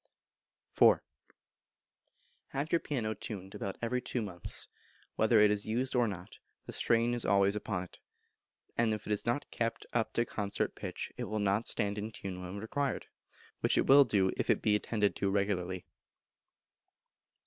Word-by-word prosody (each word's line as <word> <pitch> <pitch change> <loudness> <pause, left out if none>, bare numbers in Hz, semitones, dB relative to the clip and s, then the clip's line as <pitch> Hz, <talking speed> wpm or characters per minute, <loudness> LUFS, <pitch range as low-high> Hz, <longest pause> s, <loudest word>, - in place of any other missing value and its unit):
iv. - - +8 1.5
Have 140 +3 -3
your 170 - +4
piano 115 -9 -2
tuned 100 -3 -7
about 95 - -4
every 125 +2 0
two 125 - -2
months; 90 -4 -4 0.5
whether 110 0 +4
it 105 0 +6
is 105 0 0
used 125 +5 -1
or 120 -2 +4
not, 95 -3 -7 0.3
the - - -7
strain 115 +1 +2
is 120 - -2
always 100 +1 +3
upon 100 -3 -2
it, 90 - -14 0.8
and 115 -2 +2
if 105 - -9
it 105 - 0
is 105 - -2
not 120 +5 -1
kept 115 -1 -2
up 115 -2 +1
to 120 - +2
concert 100 -3 -2
pitch - - -5
it - - -3
will 110 - -3
not 100 +2 +1
stand 100 +1 0
in 110 +2 -4
tune 95 -3 -6
when 90 +2 -6
required, 135 +7 -2 0.5
which - - +2
it - - +3
will 140 +1 +8
do 100 -6 +2
if - - -1
it - - +3
be 105 - +4
attended 105 -1 +1
to 100 - +1
regularly. 95 -2 -1
105 Hz, 170 wpm, -32 LUFS, 100-115 Hz, 1.5 s, iv